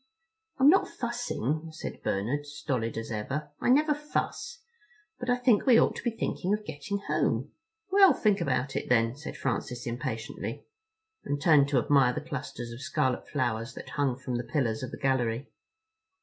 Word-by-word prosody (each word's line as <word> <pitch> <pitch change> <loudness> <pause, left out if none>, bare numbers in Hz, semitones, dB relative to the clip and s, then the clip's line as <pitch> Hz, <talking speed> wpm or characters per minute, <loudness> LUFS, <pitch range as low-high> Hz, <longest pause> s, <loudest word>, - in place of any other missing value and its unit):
"I'm 270 - +5
not 375 +6 +6
fussing," 235 - -3
said 155 - -7
Bernard, 125 +10 -1
stolid 135 -7 -3
as 115 0 -5
ever. 140 +8 -3
"I - - 0
never 300 +4 +5
fuss. 300 +10 -4 0.6
But 245 - -4
I 245 - +5
think 245 -3 +3
we 240 -3 +8
ought - - +3
to - - -5
be 240 - 0
thinking 205 -3 -1
of 210 0 -9
getting 175 +7 -4
home." 145 -3 0 0.4
"Well, 390 -1 +8
think 205 -4 +2
about 135 -2 0
it - - -3
then," 115 -1 +3
said 150 +3 -8
Francis 125 0 -2
impatiently, 120 -1 -4 0.6
and 145 - -2
turned 145 -2 +5
to 140 - +2
admire 130 0 +4
the - - -3
clusters 125 -4 -5
of 120 +2 -8
scarlet 130 -1 -1
flowers 120 -4 -1
that - - -8
hung 140 -4 0
from 130 -2 -3
the 120 - -3
pillars 120 -5 -1
of 130 - -4
the - - -8
gallery. 130 -2 0
140 Hz, 175 wpm, -29 LUFS, 120-200 Hz, 0.6 s, we